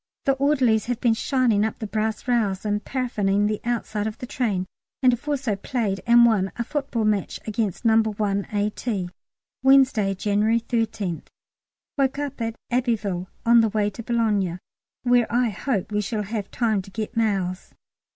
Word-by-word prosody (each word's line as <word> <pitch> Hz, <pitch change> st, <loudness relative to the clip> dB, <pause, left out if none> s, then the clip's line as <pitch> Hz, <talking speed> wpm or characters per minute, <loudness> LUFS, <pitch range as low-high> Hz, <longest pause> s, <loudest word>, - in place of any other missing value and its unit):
The 275 Hz, -, +4 dB
orderlies 260 Hz, -6 st, +2 dB
have 245 Hz, -1 st, -1 dB
been 235 Hz, -3 st, +3 dB
shining 235 Hz, -3 st, +2 dB
up 220 Hz, -, -2 dB
the 220 Hz, -, -5 dB
brass 215 Hz, +3 st, -2 dB
rails 215 Hz, -5 st, +1 dB
and 210 Hz, 0 st, -1 dB
paraffining 210 Hz, -6 st, 0 dB
the 215 Hz, 0 st, -2 dB
outside 220 Hz, -3 st, -2 dB
of 220 Hz, -, -5 dB
the -, -, -6 dB
train, 215 Hz, -7 st, -1 dB, 0.4 s
and 250 Hz, -1 st, +6 dB
have 245 Hz, +5 st, -5 dB
also 265 Hz, -7 st, 0 dB
played 200 Hz, -2 st, -2 dB
and 235 Hz, 0 st, +7 dB
won 200 Hz, -5 st, +2 dB
a 235 Hz, -, -2 dB
football 270 Hz, -4 st, -2 dB
match 210 Hz, -2 st, 0 dB
against 215 Hz, -1 st, -2 dB
No. 225 Hz, 0 st, +5 dB
1 205 Hz, -2 st, -1 dB
A.T. 205 Hz, -2 st, -2 dB, 0.5 s
Wednesday, 260 Hz, -7 st, +4 dB
January 210 Hz, +4 st, +2 dB
13th. 220 Hz, -7 st, -2 dB, 0.7 s
Woke 270 Hz, 0 st, +2 dB
at 260 Hz, -6 st, -3 dB, 0.2 s
Abbeville; 220 Hz, -7 st, 0 dB, 0.2 s
now 230 Hz, -, +3 dB
on 235 Hz, -1 st, +8 dB
the 225 Hz, -, +2 dB
way 210 Hz, 0 st, 0 dB
to 215 Hz, -, -8 dB
Boulogne, 215 Hz, -7 st, 0 dB, 0.5 s
where 245 Hz, -2 st, +3 dB
I 240 Hz, 0 st, +2 dB
hope 210 Hz, -1 st, -2 dB
we 210 Hz, 0 st, +1 dB
shall 210 Hz, +1 st, -2 dB
have 205 Hz, -1 st, -4 dB
time 220 Hz, -4 st, 0 dB
to 190 Hz, -, -13 dB
get 215 Hz, +3 st, -5 dB
mails. 195 Hz, -5 st, -1 dB
220 Hz, 170 wpm, -24 LUFS, 205-240 Hz, 0.7 s, on